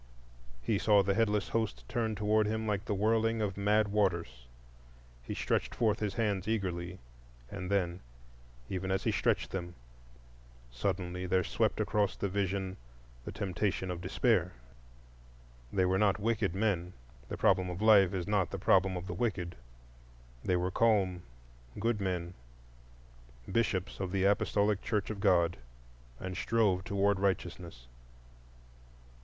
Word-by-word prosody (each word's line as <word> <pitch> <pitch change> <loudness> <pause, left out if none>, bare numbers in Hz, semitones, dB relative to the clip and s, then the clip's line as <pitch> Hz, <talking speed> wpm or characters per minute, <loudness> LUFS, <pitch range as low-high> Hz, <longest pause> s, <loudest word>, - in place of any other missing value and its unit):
He 105 -3 +1
saw 105 -2 +4
the 100 +1 +1
headless 105 -1 +1
host 110 -3 -2
turn 115 -3 -1
toward 105 +1 +2
him 110 +1 -2
like 105 -1 -1
the 105 - -1
whirling 115 +2 +2
of 100 -3 -1
mad 105 +1 +2
waters,—he - - -4
stretched - - -1
forth 110 -3 +1
his 105 -2 -2
hands 105 -5 0
eagerly, 90 -5 -2 0.5
and 90 0 -5
then, 90 -3 0 0.7
even 95 +3 -3
as 95 0 0
he - - +1
stretched - - 0
them, 90 -2 -5 1.0
suddenly 90 +5 -2
there 90 0 +2
swept - - 0
across 105 -2 +1
the 100 - -2
vision 95 -1 -2 0.5
the - - -5
temptation 95 0 -2
of 90 -1 -5
Despair. 95 -1 +1 1.2
They 95 -2 +2
were 95 +1 +2
not 100 -2 +3
wicked 105 -4 0
men,—the 85 - -3
problem 95 -1 +3
of 90 0 -5
life 105 -4 +6
is 90 -3 -2
not 100 -4 +1
the - - -4
problem 95 -1 +3
of 90 - -6
the - - -5
wicked,—they - - -5
were 90 +1 0
calm, 95 -5 +2 0.6
good 110 -1 0
men, 90 -2 -2 1.2
Bishops 95 -3 0
of 95 -2 -3
the 95 -1 0
Apostolic 100 +1 +2
Church 105 -2 -1
of 105 - -6
God, 85 -2 +3 0.6
and 95 0 -5
strove 105 -5 +1
toward 100 0 +1
righteousness. 90 -8 -2
95 Hz, 135 wpm, -32 LUFS, 90-105 Hz, 1.2 s, life